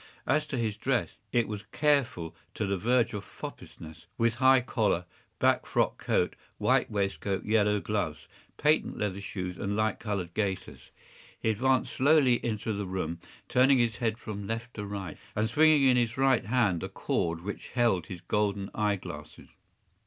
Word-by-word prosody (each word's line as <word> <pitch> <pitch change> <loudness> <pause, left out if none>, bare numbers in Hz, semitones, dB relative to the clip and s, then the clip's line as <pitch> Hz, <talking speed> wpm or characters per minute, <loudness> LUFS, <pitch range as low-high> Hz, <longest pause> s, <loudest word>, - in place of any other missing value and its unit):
As 150 +3 +1
to 140 - -3
his 110 -3 -1
dress, - - 0 0.2
it 120 -2 +2
was 105 -1 -5
careful 140 - +1 0.2
to 110 - -1
the 100 0 0
verge 120 +1 +2
of 105 - -4
foppishness, 80 +1 -10
with 115 0 +2
high 130 0 +7
collar, 105 -8 0 0.3
black - - +2
frock - - 0
coat, - - +1 0.2
white - - +2
waistcoat, 100 -1 -2
yellow 105 -1 +3
gloves, 100 -8 -3 0.3
patent 150 +1 +2
leather 100 -1 -2
shoes, 90 -2 -5
and 100 +1 -2
light 110 +1 0
colored 100 -6 -3
gaiters. 95 -3 -3 0.5
He 110 - +1
advanced 130 +4 +1
slowly 135 -3 +4
into 110 -1 -2
the 100 -1 -3
room, 90 -3 -3 0.3
turning 130 +2 +5
his 115 -2 +1
head 115 -2 -1
from 100 -3 -6
left 115 +2 -4
to 105 - -5
right, 100 -5 -6 0.2
and 110 +1 +1
swinging 155 +4 +5
in 130 -2 +5
his 115 -1 0
right 135 -4 +3
hand 105 -7 +2
the - - -4
cord 85 0 -1
which 100 +3 -6
held 115 -8 +1
his 90 -3 -7
golden 100 -1 -1
eye 105 -1 +1
glasses. 80 -6 -10
105 Hz, 165 wpm, -29 LUFS, 100-120 Hz, 0.5 s, high